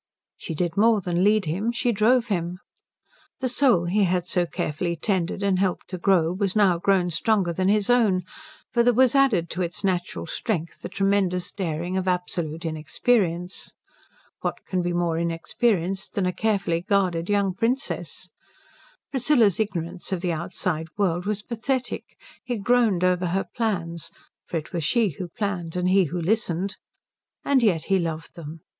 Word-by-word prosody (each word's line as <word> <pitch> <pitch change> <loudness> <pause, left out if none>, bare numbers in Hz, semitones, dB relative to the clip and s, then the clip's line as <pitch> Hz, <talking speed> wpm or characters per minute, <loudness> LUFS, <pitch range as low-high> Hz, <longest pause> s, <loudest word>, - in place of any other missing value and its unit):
She 165 - -6
did 175 +2 -2
more 220 +1 +5
than 180 -1 0
lead 210 -1 +3
him; 190 +9 -1
she 240 0 0
drove 235 +3 +3
him. 175 -2 -1 0.8
The 260 - 0
soul 245 -8 +3
he 200 +3 +2
had 180 -1 0
so 180 -1 0
carefully 170 +2 -2
tended 185 +2 -1
and 195 -2 +2
helped 190 -2 -1
to 185 - -5
grow 175 -3 +3
was 195 +1 -1
now 190 -5 +4
grown 180 -1 +2
stronger 185 +1 +1
than 185 +2 0
his 210 -1 +2
own; 220 -7 +3 0.5
for 240 - +4
there 240 0 +3
was 255 0 +5
added 260 -12 +3
to 180 - -3
its 175 +2 -3
natural 185 -2 -1
strength 170 0 -3
the - - -6
tremendous 195 -2 +1
daring 175 0 -3
of 190 0 -2
absolute 175 -3 -2
inexperience. 175 - 0 0.7
What - - -4
can 185 -1 -1
be 175 0 -1
more 170 -1 0
inexperienced 180 +3 -1
than 195 - +1
a 180 - 0
carefully 195 -6 0
guarded 185 -3 0
young 200 -2 +2
princess? 240 +8 -2 0.8
Priscilla's 245 - +3
ignorance 185 -4 -3
of 185 -3 -1
the 180 -2 0
outside 160 -1 -2
world 180 -2 0
was 210 -1 -2
pathetic. 250 +3 -3 0.3
He 245 -2 -3
groaned 215 -4 +2
over 180 0 +2
her 190 +3 0
plans 170 -8 -2 0.4
for 170 - -2
it 155 - -7
was 170 -2 -1
she 230 +5 +2
who 185 - -3
planned 175 -3 -3
and 180 0 +1
he 190 0 +4
who 175 +3 -3
listened 190 0 0 0.7
and 275 -2 +4
yet 180 -9 +2
he 195 +1 +2
loved 165 -2 -4
them. 160 -1 -9
185 Hz, 165 wpm, -24 LUFS, 170-210 Hz, 0.8 s, more